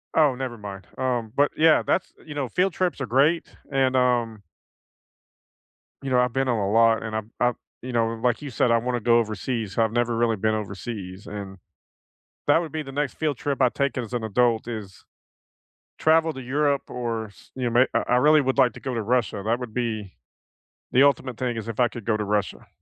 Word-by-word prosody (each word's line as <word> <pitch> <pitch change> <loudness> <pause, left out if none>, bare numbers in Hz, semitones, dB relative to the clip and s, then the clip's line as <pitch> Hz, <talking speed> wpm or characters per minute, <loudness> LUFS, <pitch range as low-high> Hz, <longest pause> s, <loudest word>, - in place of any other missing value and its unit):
Oh, 150 -5 +4
never 125 -2 -5
mind. 100 -2 -8
Um, 120 -4 -1
but, 145 +1 +3
yeah, 160 0 +5
that's 185 - 0
th - - -23
you 150 - -7
know, 140 -3 -1
field 180 +7 +1
trips 180 -6 -1
are 135 - -2
great, 145 +8 +2 0.2
and 130 -1 +2
um 120 -4 +1 1.6
you 135 - -4
know, 125 - +3
I've 125 -1 +1
been 135 0 0
on 120 -2 +1
a 100 -1 -1
lot, 115 0 +4
and 110 -1 -4
I've 110 0 -4
I've 120 -1 +2 0.3
you 125 - -6
know, 115 -1 +1
like 125 +2 +1
you 145 - -6
said, 120 -1 +1
I 115 - +5
wanna 120 0 -2
go 120 +1 +4
overseas. 110 0 -3
I've 110 -2 +2
never 120 0 0
really 115 -2 +2
been 110 +2 +1
overseas, 100 -2 -6
and 100 -2 -7 0.9
that 145 +3 +5
would 165 -3 -5
be 155 -1 -3
the 135 - -9
next 145 0 -2
field 150 -5 -1
trip 140 -1 -2
I 130 - +5
take 140 +2 -1
as 125 -1 -4
an 120 -2 -2
adult 115 +1 +1
is 105 -5 -7 0.9
travel 160 0 +3
to 135 - -8
Europe, 140 +2 0
or 115 -3 -3
s 100 - -19
you 130 -1 -2
kn - - -5
may 125 +2 +6
I - - +1
I - - +5
really 150 +4 +5
would 130 -1 -1
like 125 - +5
to - - -10
go 130 -2 -4
to 115 - -1
Russia. 110 -2 0
That 115 +3 0
would 120 -3 -7
be 110 -5 -3 0.8
the 130 - +5
ultimate 130 -3 +2
thing 125 -2 -2
is 115 - -5
if 115 0 -5
I 120 - +5
could 115 -3 -9
go 110 - +1
to 105 - -2
Russia. 105 0 -2
120 Hz, 220 wpm, -24 LUFS, 110-135 Hz, 1.6 s, may